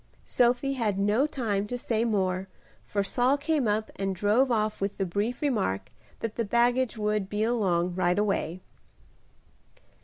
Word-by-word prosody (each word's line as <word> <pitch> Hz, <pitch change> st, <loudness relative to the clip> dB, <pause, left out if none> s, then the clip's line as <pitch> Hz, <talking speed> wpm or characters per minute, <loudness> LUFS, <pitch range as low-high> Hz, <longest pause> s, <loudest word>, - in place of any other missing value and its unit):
Sophie 245 Hz, +3 st, +2 dB
had 220 Hz, -7 st, -1 dB
no 210 Hz, +8 st, +2 dB
time 210 Hz, -8 st, -2 dB
to 245 Hz, -, -3 dB
say 230 Hz, -2 st, -1 dB
more, 190 Hz, -4 st, 0 dB, 0.4 s
for 200 Hz, -1 st, -1 dB
Saul 250 Hz, +7 st, +2 dB
came 290 Hz, -3 st, 0 dB
up 215 Hz, +1 st, 0 dB
and 195 Hz, -1 st, -1 dB
drove 210 Hz, +8 st, +3 dB
off 215 Hz, -2 st, 0 dB
with 200 Hz, 0 st, -2 dB
the 195 Hz, -, 0 dB
brief 205 Hz, -, -2 dB
remark 155 Hz, -, -1 dB, 0.3 s
that 225 Hz, -2 st, -4 dB
the 230 Hz, -, +1 dB
baggage 240 Hz, +2 st, +2 dB
would 210 Hz, -2 st, -1 dB
"be 210 Hz, +1 st, -1 dB
along 185 Hz, -7 st, +1 dB
right 180 Hz, 0 st, +1 dB
away." 195 Hz, -4 st, -1 dB
210 Hz, 155 wpm, -27 LUFS, 195-240 Hz, 0.4 s, drove